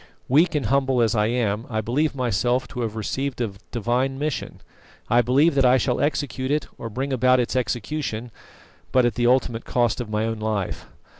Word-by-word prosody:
Weak 160 +5 +3
and 145 - 0
humble 135 +1 +2
as 115 -2 +3
I 105 -2 +2
am, 115 -2 -1
I 110 -2 -1
believe 135 +8 0
myself 125 +1 0
to 125 - -5
have 110 -2 -3
received 130 +5 -3
a 115 -4 -1 0.2
Divine 125 +3 -1
mission. 150 0 -4 0.5
I 120 - +6
believe 140 +7 +3
that 135 -1 +3
I 125 +1 +5
shall 125 0 0
execute 140 -3 -1
it, 150 +1 0
or 115 - -5
bring 135 +5 -3
about 130 0 +4
its 125 +1 -1
execution, 120 0 -2 0.6
but 130 -1 +4
at 120 - +1
the 120 +2 +1
ultimate 120 -2 +2
cost 120 -1 0
of 115 - -6
my 105 +1 0
own 115 -1 -3
life. 105 -3 -3
125 Hz, 195 wpm, -23 LUFS, 115-135 Hz, 0.6 s, I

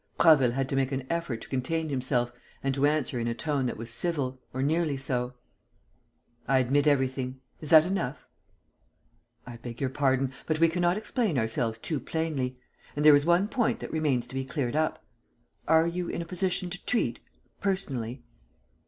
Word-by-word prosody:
Prasville 135 -7 +6
had 135 +1 -1
to - - -1
make 135 0 +1
an 135 -1 -2
effort 165 -9 -2
to - - -9
contain 155 +5 -1
himself 130 -3 0 0.3
and 135 0 +1
to 140 +2 +3
answer 145 -5 0
in 115 - -1
a 115 - -1
tone 135 +2 0
that 120 - -3
was 115 +1 -7
civil, 130 -2 -2
or 130 +1 -2
nearly 155 -1 +1
so: 125 -2 -2 1.1
"I 135 +1 +4
admit 135 +3 +2
everything. 130 -2 +1 0.2
Is 155 - -5
that 160 -1 +8
enough?" 140 -9 -2 1.2
"I 120 -1 -8
beg 120 0 -8
your 135 -2 -1
pardon, 135 -1 +1
but 155 -1 0
we 165 0 +5
cannot 175 +2 +1
explain 215 - 0
ourselves 110 -1 0
too 150 +5 -3
plainly. 135 -3 -2 0.4
And 150 +1 0
there 150 -1 +10
is 145 +2 +2
one 175 +4 +4
point 240 -1 0
that - - -7
remains 145 -6 +1
to 125 - -12
be 135 0 -1
cleared 135 -2 -2
up. 155 0 0 0.6
Are 160 0 +5
you 175 +1 -2
in 170 - -3
a - - -10
position 180 0 -2
to 180 - -5
treat, 245 - 0 0.4
personally?" 130 - -2
140 Hz, 180 wpm, -28 LUFS, 125-165 Hz, 1.2 s, there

